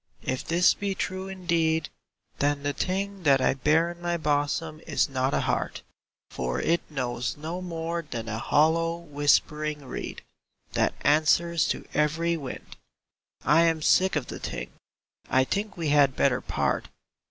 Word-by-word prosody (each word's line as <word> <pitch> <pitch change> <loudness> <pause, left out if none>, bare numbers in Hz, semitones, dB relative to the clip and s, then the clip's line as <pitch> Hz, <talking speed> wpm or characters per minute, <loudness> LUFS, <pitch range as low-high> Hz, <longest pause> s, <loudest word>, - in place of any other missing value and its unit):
If 130 - -2
this 175 +2 +4
be 200 -1 -3
true 185 +1 -3
indeed 170 -4 0 0.5
Then 145 0 +1
the 145 0 0
thing 195 +3 -2
that 140 -5 +4
I - - +3
bear 155 +5 +2
in 175 0 -12
my 175 0 -1
bosom 155 +1 -1
is - - +2
not 130 -1 0
a - - +1
heart; - - -2 0.5
For - - -2
it 170 +1 +1
knows 125 -4 -3
no 165 +4 -5
more 170 -1 -3
than 115 -1 -5
a 110 0 -3
hollow, 165 +5 +2
whispering 150 -1 0
reed 130 - -6 0.5
That - - +1
answers 160 +3 +3
to - - -2
every 160 +3 +1
wind. 140 -6 -8 0.7
I 165 - +5
am 160 -2 +1
sick 185 +2 +4
of 150 -4 0
the - - -7
thing! - - -5 0.6
I 130 - +4
think 200 +8 -3
we 165 -3 -1
had 145 -2 +4
better 130 -3 +2
part. - - -1
160 Hz, 155 wpm, -27 LUFS, 145-170 Hz, 0.7 s, I